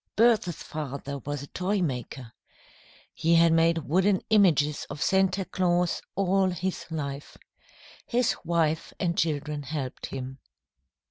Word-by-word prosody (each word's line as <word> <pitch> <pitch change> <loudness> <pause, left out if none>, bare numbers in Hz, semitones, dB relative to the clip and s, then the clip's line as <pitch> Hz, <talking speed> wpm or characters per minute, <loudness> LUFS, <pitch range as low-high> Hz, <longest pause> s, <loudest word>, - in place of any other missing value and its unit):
Bertha's 220 -7 +3
father 140 -2 -5
was 145 +2 -5
a - - -9
toy 195 +3 0
maker. 125 -6 -4 0.8
He 165 +1 +2
had 165 0 +5
made 165 0 +4
wooden 190 +4 +3
images 155 -8 +3
of - - -7
Santa 190 +2 +2
Claus 175 -1 0
all 195 0 +2
his 185 +1 -3
life. 145 -3 -5 0.7
His 245 0 +1
wife 160 -2 0
and 170 -2 0
children 150 -2 -1
helped 140 -2 -5
him. 130 0 -6
165 Hz, 125 wpm, -27 LUFS, 145-185 Hz, 0.8 s, had